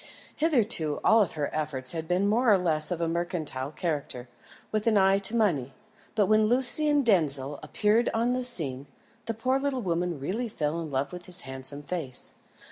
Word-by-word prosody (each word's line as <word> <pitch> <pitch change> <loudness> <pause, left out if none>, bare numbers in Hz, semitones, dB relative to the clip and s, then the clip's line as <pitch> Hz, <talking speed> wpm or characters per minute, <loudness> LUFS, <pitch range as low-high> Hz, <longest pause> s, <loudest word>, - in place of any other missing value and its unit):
Hitherto 225 - +1
all 220 -1 +5
her 150 -3 -4
efforts 140 -4 +1
had 160 -1 -4
been 180 +3 +1
more 230 +3 +3
or 200 - +6
less 160 -4 0
of 175 -2 -3
a 165 - 0
mercantile 165 -5 -3
character, 145 -6 -4 0.4
with 215 +1 -2
an 220 -2 +3
eye 195 0 +4
to 200 +4 0
money; 150 - 0 0.4
but 210 -2 +3
when 215 +2 +3
Lucian 280 +5 +3
Denzil 145 - +2
appeared 220 +3 +1
on 235 +2 0
the 255 0 -2
scene, 145 - +1 0.4
the 230 - -3
poor 255 +4 0
little 270 -3 -2
woman 175 -3 -2
really 205 - -3
fell 160 -5 -3
in 160 - -6
love 140 +3 -2
with 180 0 -9
his 180 0 0
handsome 130 +1 -2
face. 145 -7 -2
180 Hz, 180 wpm, -27 LUFS, 150-225 Hz, 0.4 s, or